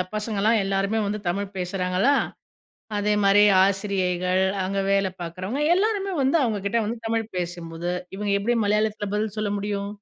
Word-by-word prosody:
பசங்கலாம் 215 +1 +1
எல்லாருமே 195 +3 0
வந்து 210 +1 -2
தமிழ் 200 +2 -3
பேசுறாங்களா, 185 +7 +1 0.9
அதேமாரி 205 -1 +4 0.2
ஆசிரியைகள், 185 -2 0 0.2
அங்க 195 +1 -2
வேலை 195 -1 +2
பார்க்குறவங்க, 185 - -4
எல்லாருமே 395 -1 0
வந்து 270 +5 +3
அவங்ககிட்ட 215 -1 0
வந்து 230 +2 -3
தமிழ் 225 -1 -1
பேசும்போது, 170 -1 -4 0.3
இவங்க 205 0 -1
எப்படி 235 +4 0
மலையாளத்தில 210 0 0
பதில் 210 0 -2
சொல்ல 210 -1 -1
முடியும்? 200 0 -3
200 Hz, 130 wpm, -24 LUFS, 190-215 Hz, 0.9 s, அதேமாரி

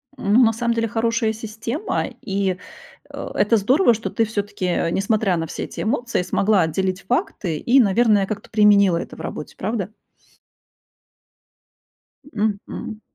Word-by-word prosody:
Ну 210 0 +3
на 225 - +3
самом 235 +1 0
деле 230 0 0
хорошая 225 0 0
система, 225 - -3 0.2
и, 195 -2 -1 0.5
а, - - -7
это 210 +3 +3
здорово, 245 - +4
что 225 +2 -4
ты 230 - +1
все-таки, 205 -2 -3
а, 175 -1 0
несмотря 200 0 +1
на 165 - -3
все - - -5
эти - - -6
эмоции, 235 -2 -1
смогла 195 +2 +2
отделить 185 +4 -1
факты, 195 - -2
и, 250 - +3
наверное, 210 -2 +4
как-то 200 +1 -6
применила 200 -4 +5
это - - -6
в - - -10
работе, - - -7
правда? 200 -1 -2 2.4
Мгм. 215 -3 -4
215 Hz, 140 wpm, -21 LUFS, 195-230 Hz, 2.4 s, применила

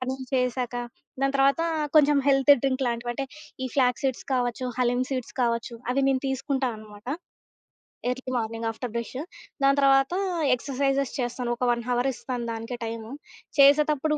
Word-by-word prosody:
పనులు 260 +1 -3
చేసాక, 250 -1 0 0.5
దాని 275 0 +1
తర్వాత 275 +3 +4 0.3
కొంచెం 295 -1 +6
హెల్తీ 275 +1 +6
డ్రింక్ 270 -1 +1
లాంటివంటే, 240 +2 -2 0.4
ఈ - - 0
ఫ్లాగ్ 250 -3 +2
సీడ్స్ 265 -3 -1
కావచ్చు, 245 0 0
హలీం 245 0 +2
సీడ్స్ 255 -3 -4
కావచ్చు 235 -1 0 0.2
అవి 265 +2 +2
నేను 270 -1 +2
తీసుకుంటానమాట. 250 -6 -3 1.0
Early 255 +1 -3
morning 225 0 -2
after 225 +1 -5
brush. 235 +3 -3 0.4
దాని 275 +1 +5
తర్వాత 270 +3 +4 0.4
ఎక్సర్‌‌సైజెస్ 275 +1 -1
చేస్తాను. 245 0 -2
ఒక 250 - 0
1 235 0 -1
అవర్ 245 +2 +1
ఇస్తాను 245 -1 -4
దానికే 230 +2 -5
టైము. 225 0 -6 0.5
చేసేతప్పుడు 300 +1 +5
255 Hz, 140 wpm, -26 LUFS, 240-275 Hz, 1.0 s, కొంచెం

